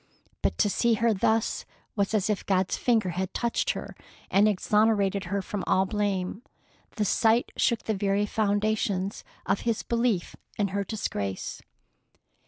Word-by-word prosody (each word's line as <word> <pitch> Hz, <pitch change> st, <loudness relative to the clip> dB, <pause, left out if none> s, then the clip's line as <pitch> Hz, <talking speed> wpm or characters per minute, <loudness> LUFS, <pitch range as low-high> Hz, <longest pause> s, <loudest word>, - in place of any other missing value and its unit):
But -, -, 0 dB
to 210 Hz, -, +3 dB
see 230 Hz, +3 st, +2 dB
her 230 Hz, +1 st, +2 dB
thus 220 Hz, +3 st, +1 dB, 0.3 s
was 200 Hz, +1 st, 0 dB
as 205 Hz, -2 st, +1 dB
if 210 Hz, -2 st, -1 dB
God's 190 Hz, -1 st, +2 dB
finger 225 Hz, -6 st, +2 dB
had 185 Hz, +2 st, -3 dB
touched 235 Hz, -1 st, 0 dB
her -, -, -7 dB, 0.4 s
and 200 Hz, +2 st, +5 dB
exonerated 205 Hz, -1 st, +2 dB
her 200 Hz, +2 st, -2 dB
from 200 Hz, 0 st, -4 dB
all 190 Hz, -, +3 dB
blame. 200 Hz, -1 st, -1 dB, 0.5 s
The 215 Hz, -3 st, 0 dB
sight 225 Hz, +4 st, +3 dB
shook 235 Hz, -2 st, +1 dB
the 220 Hz, -, -1 dB
very 200 Hz, 0 st, +1 dB
foundations 205 Hz, -2 st, 0 dB, 0.2 s
of 195 Hz, +2 st, +1 dB
his 230 Hz, -2 st, -1 dB
belief 230 Hz, -6 st, 0 dB, 0.2 s
in 205 Hz, -2 st, +1 dB
her 200 Hz, +1 st, -1 dB
disgrace. 100 Hz, -, -4 dB
205 Hz, 150 wpm, -27 LUFS, 195-220 Hz, 0.5 s, and